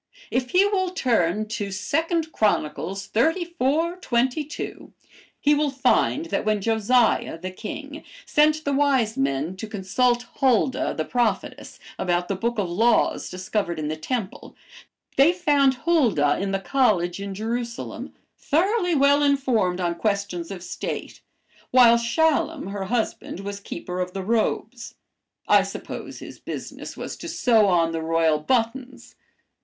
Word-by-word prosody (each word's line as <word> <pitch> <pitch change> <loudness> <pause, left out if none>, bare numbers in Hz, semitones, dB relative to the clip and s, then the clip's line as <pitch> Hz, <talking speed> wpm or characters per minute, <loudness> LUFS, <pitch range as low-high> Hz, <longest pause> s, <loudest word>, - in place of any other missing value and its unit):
If 255 0 -1
he 370 +6 +4
will 385 -3 +1
turn 215 - 0
to 205 -2 -3
2 205 +11 0 0.3
'Chron. 215 -2 +2
xxxiv. 315 - -1
22, 260 +4 -2 0.5
he 295 - +3
will 295 0 +2
find 270 +3 +1
that - - -2
when 215 -1 +1
Josiah, 225 -1 +2
the 185 +3 -6
king, 290 +9 -7 0.2
sent 305 +1 +2
the 285 - 0
wise 270 -6 +2
men 140 +6 -1
to 220 - -6
consult 240 +5 0
Huldah, 260 0 +2
the 155 - -1
prophetess, 240 -3 -2 0.2
about 175 -1 0
the 195 - 0
book 235 +5 -2
of 200 -3 0
laws 225 +8 +2
discovered 185 -1 -3
in 150 -1 -3
the 155 - -2
temple, 200 +5 -5 0.6
they 280 +5 +6
found 290 -7 +2
Huldah 230 - +3
in 195 0 -2
the 195 - 0
college 195 -7 +1
in 200 -1 -5
Jerusalem, 230 +3 -5 0.2
thoroughly 355 +3 +1
well 285 +1 +4
informed 255 -11 +1
on 175 -1 0
questions 200 -2 -2
of 185 -3 -7
state, 175 - -5 0.5
while 235 -2 +6
Shallum, 310 - 0
her 200 -1 -4
husband, 220 -3 -2
was 200 0 -6
keeper 180 -2 -6
of 180 0 -3
the 195 - -4
robes. 230 +2 -1 0.5
I - - +6
suppose - - -7
his - - -10
business - - -7
was - - -5
to - - -8
sew 225 -5 +3
on 170 -3 +2
the 165 0 -3
royal 160 -1 +2
buttons.' 250 - -2
230 Hz, 140 wpm, -24 LUFS, 190-275 Hz, 0.6 s, they